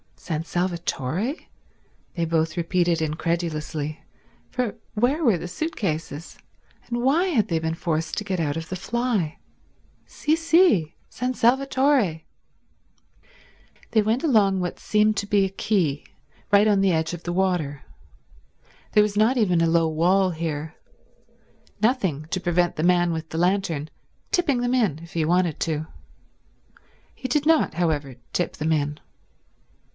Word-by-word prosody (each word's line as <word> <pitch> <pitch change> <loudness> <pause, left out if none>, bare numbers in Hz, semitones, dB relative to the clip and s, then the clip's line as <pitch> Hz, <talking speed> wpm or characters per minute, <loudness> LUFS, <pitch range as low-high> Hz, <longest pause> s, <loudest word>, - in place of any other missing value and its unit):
"San 160 -2 -4
Salvatore?" 175 - -2 0.8
they 170 -2 0
both 160 -1 0
repeated 170 -1 +1
incredulously, 155 -1 -2 0.5
for 250 -4 -2 0.2
where 260 +9 +1
were 225 - +4
the 175 - -6
suit 315 - -4
cases, 160 -4 -4 0.5
and 240 0 -2
why 300 +8 +3
had 250 - +1
they 165 -2 +1
been 160 0 -2
forced 165 -2 -2
to - - -1
get 190 -3 -2
out 150 -3 0
of 165 0 -6
the 185 - -3
fly? 220 -5 -1 0.7
"Sì, 300 - -1
sì—San 290 - +1
Salvatore." 260 - +2 1.7
They 220 - +4
went 225 +7 0
along 205 - +3
what 175 -1 -3
seemed 215 0 +2
to 200 - -2
be 200 -1 +3
a - - -2
quay, 185 -7 0 0.5
right 205 +1 +6
on 205 -2 +3
the 195 -1 +3
edge 160 +1 0
of 175 - -7
the 175 - -3
water. 175 -6 0 1.1
There 210 - +6
was 205 -1 -2
not 225 +5 +3
even 180 -7 +3
a 165 - +3
low 165 0 +3
wall 180 +4 +2
here—nothing 160 - -4
to 185 - -1
prevent 175 0 +1
the 155 - -2
man 175 -1 +3
with 160 -1 -4
the 160 - -5
lantern 175 -5 0 0.4
tipping 285 -9 +2
them 245 0 0
in 215 - +1
if 170 +1 -13
he 165 -2 0
wanted 175 -1 +1
to. 155 -1 -1 1.3
He 260 - -6
did 285 +3 0
not, 320 - +3
however, 150 -6 -1 0.2
tip 175 - -1
them 155 +1 -1
in. 150 -1 0
180 Hz, 145 wpm, -24 LUFS, 160-220 Hz, 1.7 s, right